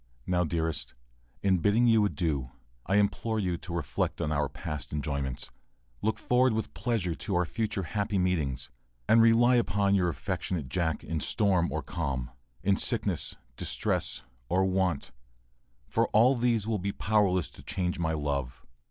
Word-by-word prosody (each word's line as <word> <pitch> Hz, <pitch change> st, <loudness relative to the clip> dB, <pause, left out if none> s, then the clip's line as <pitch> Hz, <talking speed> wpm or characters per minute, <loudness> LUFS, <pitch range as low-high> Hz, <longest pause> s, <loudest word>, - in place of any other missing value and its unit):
] -, -, -33 dB
Now, 90 Hz, -1 st, +2 dB
dearest, 80 Hz, -1 st, -2 dB, 0.5 s
in 95 Hz, -2 st, +3 dB
bidding 105 Hz, +7 st, +3 dB
you 115 Hz, -2 st, +5 dB
adieu, 80 Hz, -10 st, -1 dB, 0.4 s
I 95 Hz, -, +2 dB
implore 105 Hz, +2 st, +1 dB
you 90 Hz, -4 st, 0 dB
to 85 Hz, -, -9 dB
reflect 85 Hz, -5 st, -2 dB
on 75 Hz, -, -1 dB
our 75 Hz, -2 st, +1 dB
past 75 Hz, 0 st, -5 dB
enjoyments, 70 Hz, -3 st, -3 dB, 0.5 s
look 110 Hz, 0 st, 0 dB
forward 125 Hz, +1 st, +3 dB
with 110 Hz, 0 st, -3 dB
pleasure 110 Hz, -9 st, -1 dB
to 95 Hz, +4 st, -3 dB
our 90 Hz, 0 st, +2 dB
future 105 Hz, +1 st, -2 dB
happy 100 Hz, +3 st, -1 dB
meetings, 80 Hz, -10 st, -1 dB, 0.4 s
and 115 Hz, -, +6 dB
rely 120 Hz, +2 st, +5 dB
upon 100 Hz, -3 st, +2 dB
your 90 Hz, -3 st, +3 dB
affectionate 80 Hz, -3 st, -3 dB
Jack 80 Hz, +1 st, -1 dB
in 80 Hz, -1 st, -2 dB
storm 95 Hz, -2 st, +2 dB
or -, -, -2 dB
calm, 70 Hz, -7 st, -3 dB, 0.3 s
in 95 Hz, +1 st, +3 dB
sickness, 100 Hz, -, +1 dB, 0.2 s
distress, -, -, -1 dB, 0.3 s
or 95 Hz, +3 st, +3 dB
want, 95 Hz, -2 st, 0 dB, 0.7 s
for -, -, +1 dB
all 120 Hz, +5 st, +5 dB
these 120 Hz, -4 st, +1 dB
will 110 Hz, -2 st, -1 dB
be 100 Hz, +2 st, -2 dB
powerless 100 Hz, -5 st, +1 dB
to -, -, -13 dB
change 90 Hz, -2 st, -2 dB
my 80 Hz, -1 st, 0 dB
love. 70 Hz, -3 st, -3 dB
90 Hz, 160 wpm, -29 LUFS, 80-105 Hz, 0.7 s, and